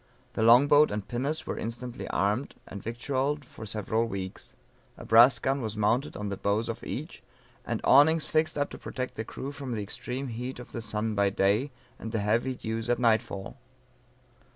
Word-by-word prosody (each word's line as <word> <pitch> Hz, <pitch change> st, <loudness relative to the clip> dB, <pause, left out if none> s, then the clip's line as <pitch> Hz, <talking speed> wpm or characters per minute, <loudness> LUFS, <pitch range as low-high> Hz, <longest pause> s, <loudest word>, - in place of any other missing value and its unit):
The -, -, -2 dB
long 120 Hz, +5 st, +7 dB
boat 150 Hz, +1 st, +6 dB
and 105 Hz, -1 st, -4 dB
pinnace 140 Hz, +6 st, -2 dB
were -, -, -4 dB
instantly 120 Hz, +2 st, -5 dB
armed, 105 Hz, +7 st, 0 dB
and 100 Hz, -, -8 dB
victualled 135 Hz, +5 st, -2 dB
for 110 Hz, -, -10 dB
several 110 Hz, +2 st, 0 dB
weeks, 95 Hz, -4 st, -7 dB, 0.4 s
a -, -, -10 dB
brass 115 Hz, +2 st, +7 dB
gun 135 Hz, +4 st, 0 dB
was 110 Hz, -2 st, -4 dB
mounted 115 Hz, +7 st, +1 dB
on 105 Hz, -1 st, -3 dB
the 100 Hz, -, -4 dB
bows 105 Hz, +4 st, 0 dB
of -, -, -5 dB
each, -, -, -6 dB, 0.5 s
and -, -, -1 dB
awnings 155 Hz, +4 st, +6 dB
fixed 155 Hz, -1 st, +1 dB
up 145 Hz, 0 st, -1 dB
to -, -, -8 dB
protect 130 Hz, -1 st, -5 dB
the 110 Hz, -, -4 dB
crew 135 Hz, +5 st, -6 dB
from 140 Hz, -4 st, -6 dB
the 105 Hz, -2 st, -2 dB
extreme 125 Hz, +6 st, -5 dB
heat 125 Hz, +3 st, -5 dB
of 125 Hz, -, -10 dB
the 115 Hz, -, -5 dB
sun 110 Hz, 0 st, -2 dB
by 100 Hz, -1 st, +2 dB
day, 100 Hz, +7 st, +2 dB, 0.3 s
and 110 Hz, -, -6 dB
the 110 Hz, -, -1 dB
heavy 115 Hz, +5 st, +1 dB
dews 115 Hz, 0 st, -4 dB
at 120 Hz, -, +3 dB
nightfall. 110 Hz, -4 st, 0 dB
115 Hz, 190 wpm, -28 LUFS, 105-130 Hz, 0.5 s, long